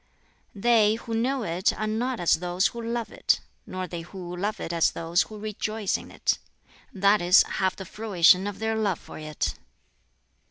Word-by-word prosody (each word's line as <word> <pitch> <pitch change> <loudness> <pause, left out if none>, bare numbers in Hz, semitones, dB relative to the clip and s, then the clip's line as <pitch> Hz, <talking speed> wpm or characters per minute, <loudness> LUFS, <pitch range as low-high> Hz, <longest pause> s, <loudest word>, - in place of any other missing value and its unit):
"They 215 0 +4
who 230 0 -7
know 250 +3 0
it 175 0 +1
are 215 - -3
not 235 +3 -1
as 175 - +3
those 180 +2 0
who 235 - -7
love 230 0 -3
it, - - +1 0.3
nor 185 0 -4
they 175 -1 -6
who 175 0 -8
love 205 +4 -2
it 170 - -4
as 165 -1 +3
those 170 +2 0
who 215 - -5
rejoice 215 0 -2
in - - -5
it - - 0 0.5
that 200 +1 +3
is, 175 +1 +6
have 190 -1 -1
the 190 - -8
fruition 190 -2 +3
of 205 - -5
their 220 0 -1
love 205 -5 0
for - - -11
it. 155 -1 -3
200 Hz, 185 wpm, -26 LUFS, 180-220 Hz, 0.5 s, is